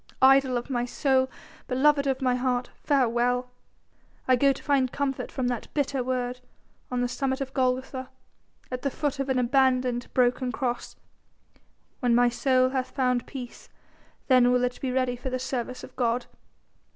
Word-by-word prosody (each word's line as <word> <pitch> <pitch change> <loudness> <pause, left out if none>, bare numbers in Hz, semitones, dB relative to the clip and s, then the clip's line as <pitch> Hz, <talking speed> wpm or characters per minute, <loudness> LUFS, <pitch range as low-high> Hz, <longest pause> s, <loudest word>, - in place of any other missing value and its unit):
"Idol 265 -1 +5
of 240 +3 -5
my 240 -2 0
soul, 260 +1 +1 0.4
beloved 280 +2 +3
of 265 0 -1
my 255 -1 +3
heart, 250 0 -1
farewell. 250 -2 +1 0.8
I 255 - +5
go 275 +3 +4
to - - -6
find 270 -3 +2
comfort 280 -2 -2
from 260 -2 -2
that 245 -2 -4
bitter 275 -3 0
word 250 0 -2 0.5
on 250 -1 -1
the 245 - +1
summit 265 +2 -2
of 270 -1 -5
Golgotha, 260 0 -1 0.6
at 250 0 -3
the 280 - 0
foot 285 0 -2
of 275 0 -2
an 260 - +1
abandoned, 255 -1 +2
broken 250 0 +2
Cross. 245 -3 -3 1.0
When 245 -2 +2
my 245 0 +5
soul 255 +1 +2
hath 260 -1 -2
found 250 -3 0
peace 250 -3 -9 0.6
then 250 -2 +5
will 250 0 +2
it 250 0 -2
be 260 - -1
ready 255 -1 0
for 250 +2 -5
the 255 - -2
service 255 -1 -4
of - - -11
God. 240 -1 0
255 Hz, 165 wpm, -26 LUFS, 245-265 Hz, 1.0 s, Idol